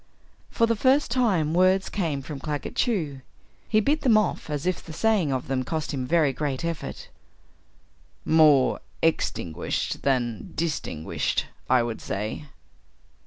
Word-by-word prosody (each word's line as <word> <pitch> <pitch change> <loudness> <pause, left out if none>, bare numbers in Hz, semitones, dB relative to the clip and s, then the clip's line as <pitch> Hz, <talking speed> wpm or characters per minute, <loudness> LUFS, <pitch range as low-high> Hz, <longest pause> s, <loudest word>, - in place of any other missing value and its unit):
For 230 - +2
the 230 0 +1
first 260 +4 +3
time 195 -12 +2
words 185 +2 +3
came 160 -9 -2
from 145 0 -7
Claggett 150 0 -4
Chew. 160 - 0 0.5
He 215 - +4
bit 290 +8 +1
them 235 -6 +5
off 215 -6 -1
as 150 +1 -3
if 185 -1 -1
the 160 - -9
saying 205 -5 +2
of 130 -2 -2
them 130 -1 0
cost 155 +3 -3
him 130 -2 -3
very 155 -3 +3
great 140 +1 -2
effort. 165 - -5 1.2
"More 150 -4 +5 0.2
_ex_tinguished 90 - -1
than 120 -5 -1
_dis_tinguished, 150 - -2 0.3
I 125 -2 +4
would 115 -1 -4
say." 105 +9 -4
155 Hz, 140 wpm, -25 LUFS, 135-190 Hz, 1.2 s, them